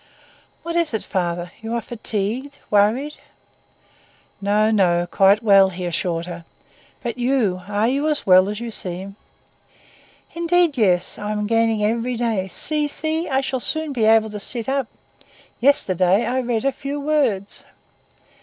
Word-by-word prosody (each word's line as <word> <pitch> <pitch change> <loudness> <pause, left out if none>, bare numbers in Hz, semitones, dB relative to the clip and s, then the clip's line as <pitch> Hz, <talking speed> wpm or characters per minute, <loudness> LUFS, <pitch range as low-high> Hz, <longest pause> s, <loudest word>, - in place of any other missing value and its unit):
"What 335 0 -4
is 335 -8 +1
it, 220 - -2
father? 175 -1 -3
You 225 +1 -4
are - - 0
fatigued, 230 +5 -4
worried—" 225 +9 +2 1.2
"No, 210 +2 +2
no, 175 -5 +2
quite 195 +4 +3
well," 195 -3 +6
he 180 0 -7
hastily - - -2
assured 170 -1 -2
her. 170 -1 -8 0.6
"But 240 0 -4
you! 240 -8 +1
are 205 +2 0
you 280 +4 0
as 300 -1 0
well 185 +1 +6
as 210 0 -4
you 235 -1 -5
seem?" 190 0 -5 1.2
"Indeed, 340 -2 +2
yes. 185 -7 +1
I 210 - -4
am 210 0 -2
gaining 225 -1 +1
every 230 +3 0
day. 225 -5 -1
See! 300 - 0
see! 315 +3 -2
I 265 -1 +1
shall 265 -1 -2
soon 315 +3 -2
be 230 -4 +1
able 220 0 +4
to 210 - -6
sit 230 +2 0
up. 270 -2 -1 0.7
Yesterday 195 -7 +2
I 255 +2 0
read 240 -2 -1
a 275 - +3
few 280 +2 -5
words." 275 -10 0
225 Hz, 155 wpm, -21 LUFS, 195-270 Hz, 1.2 s, well